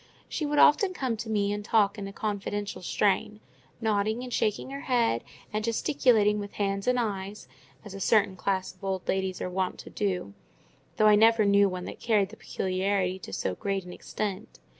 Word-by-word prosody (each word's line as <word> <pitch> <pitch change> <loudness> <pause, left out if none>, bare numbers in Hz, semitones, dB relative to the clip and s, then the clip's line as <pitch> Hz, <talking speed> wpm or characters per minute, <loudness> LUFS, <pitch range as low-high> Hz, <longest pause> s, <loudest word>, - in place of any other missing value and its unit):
She 305 - -2
would 295 0 -1
often 370 +6 +5
come 255 -7 -1
to 225 +1 -6
me 205 -2 +1
and 205 0 -4
talk 205 -1 +3
in 200 - -5
a - - -7
confidential 205 -1 -3
strain; 205 +3 0 0.4
nodding 220 +1 0
and 250 -1 -6
shaking 220 +5 -1
her 275 0 -5
head, 230 - +2 0.3
and 215 0 -1
gesticulating 225 -2 +2
with 205 0 -6
hands 195 0 -2
and 250 0 +3
eyes, 200 - -4 0.4
as 205 - -9
a 195 - -7
certain 200 -1 +3
class 190 0 -2
of 185 - -26
old 190 -1 -3
ladies 190 -1 -1
are - - -2
wont 185 0 -1
to - - -12
do; 185 - -2 0.6
though 215 - +4
I 210 - +7
never 220 +1 +5
knew 200 0 +5
one 180 -1 -5
that - - -8
carried 210 -5 +2
the 220 - -11
peculiarity 190 -1 -1
to 180 - -9
so 95 - -2
great 195 - -2
an 180 - -8
extent. 205 0 -5
205 Hz, 195 wpm, -28 LUFS, 190-220 Hz, 0.6 s, I